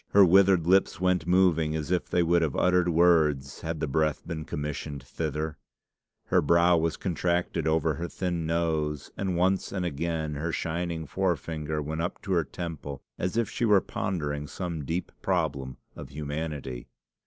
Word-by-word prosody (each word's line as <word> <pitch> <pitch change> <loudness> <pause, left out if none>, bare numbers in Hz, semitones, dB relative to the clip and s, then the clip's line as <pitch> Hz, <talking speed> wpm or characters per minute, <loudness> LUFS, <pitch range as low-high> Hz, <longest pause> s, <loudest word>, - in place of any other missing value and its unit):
Her 100 -1 +8
withered 95 -1 +5
lips 95 +1 +3
went 90 -3 +1
moving 85 -4 +3
as 80 +2 -3
if 90 - 0
they 90 - +2
would 85 +1 +3
have 80 -4 0
uttered 90 -1 +3
words 80 -6 +3
had 80 -1 -3
the 80 - -1
breath 75 +2 0
been 80 -3 -4
commissioned 75 -1 -4
thither; 75 +2 -4 0.7
her - - +4
brow 85 +3 +4
was 80 -1 0
contracted 85 -2 -1
over 80 0 +2
her 85 +4 -4
thin 85 -3 -2
nose; 80 -3 -1
and 95 -3 -2
once 95 +2 +1
and 95 -3 -2
again 80 -1 -2
her 80 +3 -2
shining 85 0 -2
forefinger 80 -4 -2
went 80 +2 -3
up 90 - -3
to 100 - -5
her 85 -3 +3
temple 75 -2 -6 0.2
as 90 +5 -1
if 115 -2 +2
she - - -4
were 105 -4 +6
pondering 75 -6 -3
some 85 -5 -4
deep 85 +4 -3
problem 75 -8 -1 0.2
of 65 - -9
humanity. 75 -3 -5
80 Hz, 165 wpm, -28 LUFS, 75-90 Hz, 0.7 s, Her